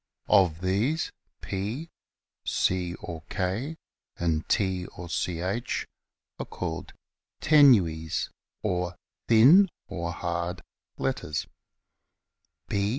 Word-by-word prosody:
Of 85 -4 +4
these 105 - +1 0.3
P, 110 - -4 0.5
C 90 -1 0
or 85 -3 -7
K, 105 - -2 0.4
and 80 -2 -1
T 95 -4 +1
or 90 - -9
Ch 90 +7 -2 0.5
are - - -3
called - - -5 0.5
tenues 95 - +4 0.3
or 90 -1 -1 0.3
thin 145 - +7 0.2
(or 85 -5 -3
hard) 85 +1 -3 0.3
letters. 75 - -2
95 Hz, 85 wpm, -27 LUFS, 85-115 Hz, 0.5 s, thin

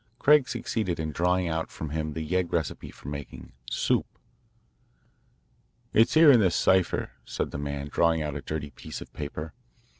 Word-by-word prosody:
Craig 145 -1 +5
succeeded 105 -9 -2
in 80 -1 -2
drawing 90 +3 +1
out 80 0 -2
from 80 -2 -6
him 75 0 -2
the 80 0 -4
yegg 90 +1 0
recipe 80 -4 -2
for - - -13
making 70 -1 -7 0.2
"soup." - - +1 1.9
"It's 115 +5 +4
here 155 -2 +9
in 125 - +7
this 95 -5 +3
cipher," 95 -1 +2
said - - -3
the - - -5
man, 70 0 -4
drawing 80 +1 +2
out 75 -2 -4
a 70 - -4
dirty 75 -1 -5
piece - - -8
of - - -11
paper. 75 +2 -6
80 Hz, 170 wpm, -27 LUFS, 75-95 Hz, 1.9 s, here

